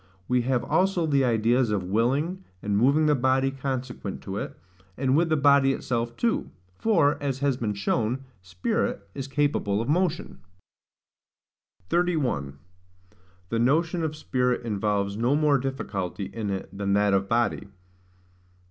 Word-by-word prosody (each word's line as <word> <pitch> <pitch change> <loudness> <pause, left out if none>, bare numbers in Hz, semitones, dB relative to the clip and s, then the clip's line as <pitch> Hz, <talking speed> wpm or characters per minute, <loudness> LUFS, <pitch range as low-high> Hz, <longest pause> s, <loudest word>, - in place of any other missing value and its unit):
We 125 0 +2
have 125 0 0
also 185 -2 +1
the 140 -3 +2
ideas 120 +1 +2
of 105 -3 0
willing, 135 - 0 0.2
and 105 -1 0
moving 140 +8 +4
the 150 - +4
body 130 0 +2
consequent 130 -6 -4
to 95 0 -5
it, - - -5 0.4
and 130 0 +1
with 165 +2 +3
the 155 - +2
body 140 -1 +5
itself 120 -2 -3
too; 235 -1 0 0.3
for, 165 -12 +2
as 140 -3 -1
has 140 -1 +1
been 110 -4 -2
shown, 115 +6 -1 0.2
spirit 90 +2 -2
is 135 -1 -5
capable 135 -8 0
of 115 - -2
motion. 170 +3 0 1.5
31. 135 - 0 0.9
The 115 - 0
Notion 160 +8 +2
of 155 -1 -2
Spirit 125 -4 -1
involves 100 -2 -1
no 120 +5 +2
more 150 -2 +3
Difficulty 100 -8 -4
in 110 -3 -3
it 95 0 -5
than 100 0 -1
that 100 0 +3
of 95 0 +1
Body. 115 -3 0
130 Hz, 145 wpm, -26 LUFS, 105-145 Hz, 1.5 s, body